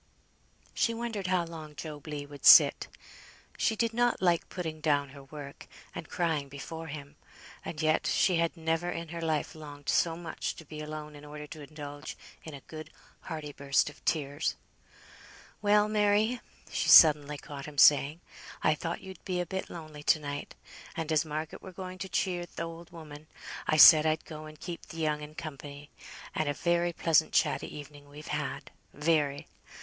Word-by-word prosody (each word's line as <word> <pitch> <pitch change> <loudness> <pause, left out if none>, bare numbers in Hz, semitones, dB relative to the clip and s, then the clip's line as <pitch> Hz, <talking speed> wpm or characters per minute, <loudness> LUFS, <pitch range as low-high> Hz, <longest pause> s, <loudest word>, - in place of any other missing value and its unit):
She 230 - +1
wondered 225 -5 -3
how 180 -2 +1
long 160 -2 -9
Job 150 -1 -8
Legh 145 -1 -5
would 145 -1 -12
sit. - - +8 0.7
She 225 - +1
did 230 +1 0
not 240 +1 +2
like 175 -2 +2
putting 160 -4 -5
down 145 -2 +1
her 140 0 -12
work, 140 0 -10 0.3
and - - -7
crying 160 -5 -1
before 160 +4 -7
him, 145 -1 -9 0.5
and 150 - -6
yet 155 0 +2
she 180 -3 +3
had 170 +1 0
never 165 +2 -1
in 165 -2 -5
her 170 0 -6
life 160 -2 -1
longed 145 -2 -9
so 165 -1 +2
much 170 -2 -4
to 165 - -12
be 150 +1 -9
alone 150 0 -7
in 145 - -12
order 150 0 -8
to 155 +1 -10
indulge 145 0 -8 0.3
in 160 -3 -8
a 140 - -10
good 155 -1 -9 0.3
hearty 155 -3 -6
burst 140 +1 +1
of 145 - -21
tears. 145 -1 -1 1.1
"Well, 210 0 +4
Mary," 215 +3 +2 0.3
she - - 0
suddenly 150 -2 +8
caught 140 0 -8
him 150 -1 -10
saying, 145 +3 +6 0.4
"I 155 - +4
thought 165 +2 -4
you'd 190 -1 -11
be 180 -1 -2
a 180 - -1
bit 190 +3 -4
lonely 155 -3 -9
to 155 - +3
night; 145 -1 -6 0.4
and 165 -1 -3
as 155 0 +3
Margaret 155 0 -5
were 190 - -9
going 185 0 -8
to 190 - -5
cheer 175 -2 -1
th' - - -8
old 165 0 -7
woman, 155 -3 -11 0.4
I 155 - +2
said 155 0 +10
I'd 155 0 0
go 155 -1 -8
and 155 0 -13
keep 175 -2 -7
th' - - -11
young 155 -2 -1
un 150 +1 -9
company; 145 -2 -8 0.4
and 155 -2 0
a 145 - -1
very 170 +3 +1
pleasant, 160 -2 +2
chatty - - +2
evening 145 0 -11
we've 150 +1 -11
had; 150 -2 -4 0.2
very. 150 -2 +1
155 Hz, 180 wpm, -30 LUFS, 145-170 Hz, 1.1 s, said